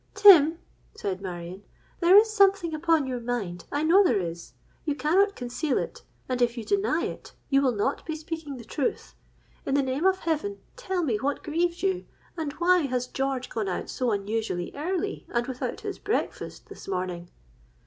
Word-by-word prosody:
'Tim,' 340 -6 +8 0.4
said 190 -1 -3
Marion, 180 0 -6 0.4
'there 360 +3 +7
is 435 +1 +5
something 390 -5 +4
upon 320 -1 +2
your 255 -2 -3
mind: 220 -8 -3
I 290 +1 0
know 360 +6 +6
there 240 - +3
is. 170 -1 -6 0.3
You 295 -2 -1
cannot 385 +8 +2
conceal 250 +3 -2
it; - - -4 0.3
and 255 -1 -2
if 240 0 +2
you 230 - -4
deny 405 +1 +1
it, - - -7 0.2
you 275 0 +5
will 255 -4 +2
not 210 +7 -1
be 315 - -2
speaking 315 -3 -6
the 235 - -9
truth. 270 +3 -3 0.5
In 275 - 0
the 280 - +3
name 265 +7 +1
of 375 0 +2
heaven, 335 +5 -1 0.2
tell 380 -8 -2
me 240 -9 +1
what 275 +6 -2
grieves 340 +3 -1
you! 380 -2 0 0.3
And 315 -4 -3
why 360 +3 +4
has 250 -1 -1
George 265 0 -2
gone 215 -4 -2
out 180 - -3
so 250 -2 -1
unusually 205 -3 -2
early 365 +7 -3
and 240 0 0
without 255 -1 -4
his - - -5
breakfast 425 - -3
this - - -11
morning?' 180 -2 -3
285 Hz, 180 wpm, -27 LUFS, 235-345 Hz, 0.5 s, Tim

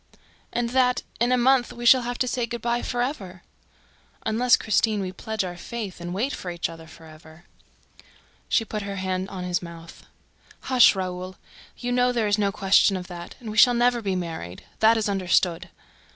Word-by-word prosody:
"And 235 -1 -2
that, 250 -1 +2 0.2
in 240 +1 +2
a 255 - +4
month, 250 0 +3
we 240 0 -8
shall 255 +2 +7
have 245 0 -4
to 255 - 0
say 245 -1 -1
good 235 -1 -6
by 240 0 0
for 245 -1 -1
ever!" 190 - -6 0.8
"Unless, 240 +3 +3
Christine, 215 0 +1
we 185 -2 -3
pledge 220 +3 -4
our 180 -1 -5
faith 200 0 -7
and 175 0 -5
wait 230 +10 -1
for 180 - -6
each 170 -1 -3
other 165 -1 -11
for 160 0 -15
ever." 160 +1 -15 1.1
She 225 - +2
put 215 0 -4
her 200 0 -5
hand 190 0 -3
on 185 -2 -6
his 180 0 -1
mouth. 170 -1 -12 0.5
"Hush, 250 -5 +5
Raoul!... 185 0 -5 0.4
You 245 0 -4
know 250 0 +3
there 235 -3 0
is 205 +1 +1
no 200 -1 +1
question 195 0 +3
of 180 - -7
that... 175 -1 -9
And 225 -3 -7
we 215 - -7
shall 245 +2 +7
never 240 0 +2
be 195 -3 -1
married: 160 - -6 0.2
that 225 +1 +5
is 220 - 0
understood!" 185 -2 +1
205 Hz, 195 wpm, -24 LUFS, 180-240 Hz, 1.1 s, shall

